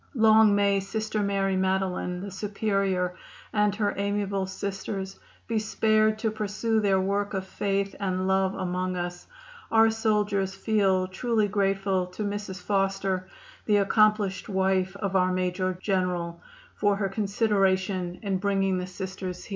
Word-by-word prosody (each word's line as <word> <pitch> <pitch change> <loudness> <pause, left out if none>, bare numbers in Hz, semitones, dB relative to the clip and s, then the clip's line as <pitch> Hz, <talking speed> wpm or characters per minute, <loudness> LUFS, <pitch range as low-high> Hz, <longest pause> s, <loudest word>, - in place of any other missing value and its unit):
Long 220 -2 +6
may 200 -1 +3
Sister 215 +2 -2
Mary 195 -1 0
Madeline, 185 -1 -1
the 200 0 -6
Superior, 195 -2 -1 0.4
and 210 -1 +2
her 205 -1 0
amiable 200 -1 -1
Sisters 195 0 -5 0.3
be 225 -2 0
spared 215 0 +2
to 220 0 -1
pursue 215 +1 -1
their 195 -2 +2
work 200 +2 -1
of 190 0 -2
faith 195 0 -1
and 185 -1 -1
love 190 0 +2
among 185 0 -2
us. 175 0 -5 0.4
Our 225 0 +5
soldiers 210 -3 0
feel 195 -3 +2
truly 215 +3 0
grateful 195 -2 0
to 180 +4 -6
Mrs. 205 -2 -4
Foster, 195 -1 0 0.4
the 210 -1 +4
accomplished 210 -1 +2
wife 190 -1 +1
of 200 -1 -3
our 185 -1 +3
Major 185 0 -1
General, 180 -3 -1 0.3
for 205 -1 +1
her 200 0 -1
consideration 195 -3 0
in 195 -2 0
bringing 195 -1 +1
the 180 - -4
Sisters 185 0 -6
here." - - -14
195 Hz, 140 wpm, -27 LUFS, 185-205 Hz, 0.4 s, Long